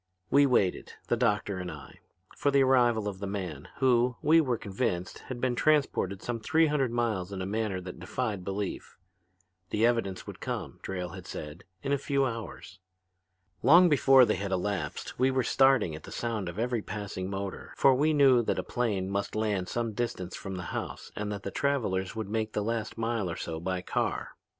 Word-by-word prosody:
"We 140 0 +6
waited, 100 -8 +1 0.2
the - - +3
doctor 105 -5 0
and 90 -1 -4
I, - - -11 0.4
for 145 - +1
the 140 -1 +4
arrival 120 -5 +3
of 95 -2 -4
the 100 - -4
man 90 -8 -5
who, 125 -2 +3
we 165 +2 +6
were 125 -6 0
convinced, 95 -4 -2
had 130 -2 -5
been 125 0 +1
transported 120 -9 +1
some 120 -1 -3
three 160 +8 +3
hundred 145 -4 +1
miles 110 -6 -1
in 95 - -5
a 95 - -2
manner 105 -1 -1
that 90 -1 -8
defied 100 +1 -3
belief. 100 +1 -4 0.7
The 110 +2 +2
evidence 115 -6 0
would - - -9
come, - - -5
Drayle 90 -2 -4
had 95 -1 -9
said, 75 +3 -7 0.2
in 140 - -2
a 140 - +2
few 140 0 +1
hours. 115 -5 -6 0.8
Long 170 +8 +7
before 135 -3 +6
they - - 0
had 100 -1 -3
elapsed 95 +4 -3
we 130 +1 +4
were 130 -1 +1
starting 135 - +4
at 75 - -9
the - - -11
sound 110 -6 -2
of 85 - -8
every 120 0 0
passing 100 -3 -5
motor, 100 -1 -5
for 135 - +6
we 150 +5 +3
knew 135 -5 +5
that 115 - -1
a - - -1
plane 105 -7 -1
must 100 +1 -2
land 105 -4 0
some 115 -2 -2
distance 100 -5 -3
from 95 -1 -6
the 90 - -5
house - - -5
and 105 0 -3
that 100 -1 -5
the 100 - -4
travelers 110 -10 0
would 110 -2 -3
make 110 +1 -2
the 105 - 0
last 115 0 -2
mile 115 -4 -1
or 80 - -3
so 80 -1 -4
by 90 +2 -2
car. - - -1
110 Hz, 200 wpm, -29 LUFS, 95-125 Hz, 0.8 s, Long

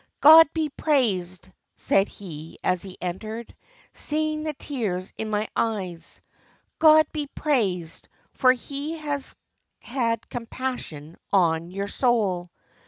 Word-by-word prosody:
'God 315 +1 +9
be 320 -2 0
praised,' 200 - 0 0.2
said 195 0 +2
he, 160 -5 -10
as 185 -1 +1
he 190 -2 -9
entered, 215 +6 -5 0.4
seeing 310 0 -1
the 310 0 -3
tears 210 -11 -3
in 220 - -4
my 215 0 0
eyes, 185 -7 -2 0.6
'God 310 0 +7
be 300 -2 -3
praised, 195 - -1 0.2
for 255 -1 +4
He 280 +5 -4
has 290 -3 -2 0.4
had 235 -2 -2
compassion 230 - -5
on 170 -3 +2
your 200 +2 -4
soul. 200 -8 +1
225 Hz, 115 wpm, -25 LUFS, 185-285 Hz, 0.6 s, God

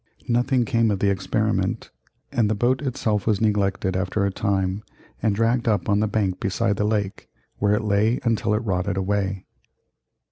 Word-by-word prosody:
Nothing 120 +1 +2
came 115 -3 +2
of 100 - +1
the 100 +1 +2
experiment, 95 -1 -1 0.4
and 120 -6 +1
the 110 - +1
boat 125 +6 +1
itself 110 -7 -1
was 105 -3 +2
neglected 100 -3 0
after 95 +2 0
a 100 - 0
time 95 0 -1 0.4
and 110 -2 +1
dragged 115 +2 +1
up 105 -5 +1
on 100 0 +2
the 110 - +1
bank 100 -4 -1
beside 105 +1 0
the 105 - 0
lake, 105 -2 -2 0.3
where 100 0 +2
it 105 - -1
lay 105 +3 +2
until 115 -3 +1
it 115 +2 -2
rotted 95 -1 -1
away. 95 -1 -1
105 Hz, 175 wpm, -23 LUFS, 100-115 Hz, 0.4 s, Nothing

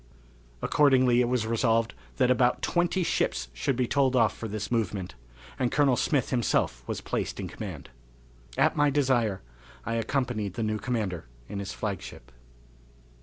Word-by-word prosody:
Accordingly 130 -4 +4
it 120 - +2
was 125 -2 0
resolved 115 0 +1 0.2
that 125 - +3
about 125 -1 +2
twenty 175 +1 +1
ships - - 0
should 60 - -1
be 125 0 +1
told 135 -1 +2
off 115 -3 +3
for 115 - -5
this 105 0 -5
movement, 100 -5 -1 0.5
and 125 -2 +1
Colonel 140 -3 +3
Smith 135 0 0
himself 115 - +1
was - - -3
placed - - -3
in - - -3
command. - - -8 0.7
At - - +3
my 145 0 +4
desire 125 - +1 0.4
I 115 - -2
accompanied 115 -4 -1
the 115 - -2
new 110 0 -1
commander 105 - -2 0.2
in 100 - -5
his 100 0 -5
flagship. 95 - -6
115 Hz, 155 wpm, -28 LUFS, 105-130 Hz, 0.7 s, Accordingly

